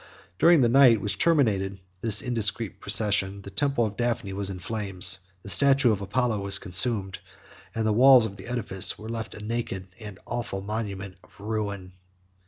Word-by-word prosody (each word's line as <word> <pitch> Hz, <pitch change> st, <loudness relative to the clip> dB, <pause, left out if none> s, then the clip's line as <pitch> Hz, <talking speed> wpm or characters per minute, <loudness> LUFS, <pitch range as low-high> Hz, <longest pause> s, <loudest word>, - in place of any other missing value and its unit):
During 170 Hz, -3 st, +5 dB
the 120 Hz, -, +4 dB
night 120 Hz, -2 st, +5 dB
which 105 Hz, +1 st, -4 dB
terminated 100 Hz, -, +1 dB, 0.2 s
this 110 Hz, -2 st, +3 dB
indiscreet 115 Hz, -3 st, -2 dB
procession, 100 Hz, -1 st, +1 dB
the 100 Hz, -, -10 dB
temple 140 Hz, -3 st, +1 dB
of 105 Hz, -1 st, -6 dB
Daphne 120 Hz, -5 st, -2 dB
was 100 Hz, 0 st, 0 dB
in 95 Hz, -, -6 dB
flames; 95 Hz, -2 st, 0 dB, 0.2 s
the -, -, -12 dB
statue 135 Hz, +6 st, +4 dB
of 100 Hz, -2 st, -2 dB
Apollo 110 Hz, +2 st, -1 dB
was 100 Hz, -1 st, 0 dB
consumed; 95 Hz, +1 st, 0 dB, 0.6 s
and 110 Hz, -1 st, -1 dB
the 110 Hz, -, +1 dB
walls 125 Hz, +1 st, +6 dB
of 100 Hz, -3 st, -6 dB
the -, -, -11 dB
edifice 115 Hz, -6 st, -1 dB
were 110 Hz, +1 st, -10 dB
left 115 Hz, -1 st, -6 dB
a 105 Hz, -, -10 dB
naked 105 Hz, -5 st, -4 dB
and 105 Hz, -4 st, -10 dB
awful 115 Hz, -5 st, -5 dB
monument 100 Hz, -3 st, -6 dB
of -, -, -22 dB
ruin. 100 Hz, -3 st, -4 dB
105 Hz, 175 wpm, -25 LUFS, 100-120 Hz, 0.6 s, walls